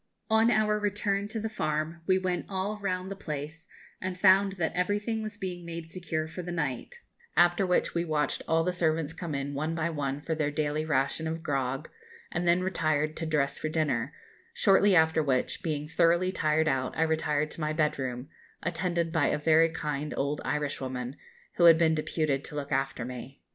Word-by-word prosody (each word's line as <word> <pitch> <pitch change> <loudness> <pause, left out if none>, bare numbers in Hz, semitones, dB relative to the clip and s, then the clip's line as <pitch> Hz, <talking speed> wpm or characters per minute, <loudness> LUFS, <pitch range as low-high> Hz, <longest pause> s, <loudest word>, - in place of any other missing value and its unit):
On 220 +1 +5
our 210 -1 +2
return 205 -1 0
to 220 +1 -4
the 220 - -2
farm, 155 -4 -2
we 185 -1 +4
went 185 -1 -2
all 200 +2 -2
round 185 -1 -2
the - - -3
place, 155 -1 -6 0.3
and 185 -1 -3
found 195 +1 +5
that 175 -4 -1
everything 205 +5 0
was 215 -1 -5
being 180 -3 -5
made 165 -1 -7
secure 160 -3 -3
for 165 +3 -6
the 175 0 -6
night; 165 - -3 0.4
after 175 +2 +4
which 180 - +1
we 170 - 0
watched 155 -3 0
all 165 0 +3
the 180 +1 0
servants 165 -3 0
come 165 -5 -5
in 140 +1 -3
one 155 +3 -2
by 165 0 -1
one 140 -3 -2
for 160 +2 -3
their 155 -2 0
daily 150 +1 -1
ration 150 +2 0
of 160 0 -4
grog, 135 -1 -1 0.4
and 175 - -1
then 175 +1 +4
retired 155 -4 0
to 165 - -3
dress 145 -3 0
for 155 - -2
dinner, 155 -8 0 0.4
shortly 195 0 +5
after 160 -1 +4
which, 135 -4 0
being 150 -2 -2
thoroughly 170 +3 +3
tired 155 -2 +1
out, 130 -3 0
I 160 - +3
retired 155 -2 0
to - - -8
my 155 0 0
bed 155 -2 +1
room, 125 0 -4 0.4
attended 170 -1 -1
by 160 -4 +3
a - - +1
very 160 +2 +4
kind 150 -2 -3
old 140 +2 -1
Irishwoman, 130 -3 -3 0.4
who 175 - +5
had 165 -1 +9
been 160 -1 +3
deputed 155 -2 -1
to - - -8
look 145 0 -4
after 135 -3 -1
me. 125 +2 -8
160 Hz, 195 wpm, -29 LUFS, 150-180 Hz, 0.4 s, had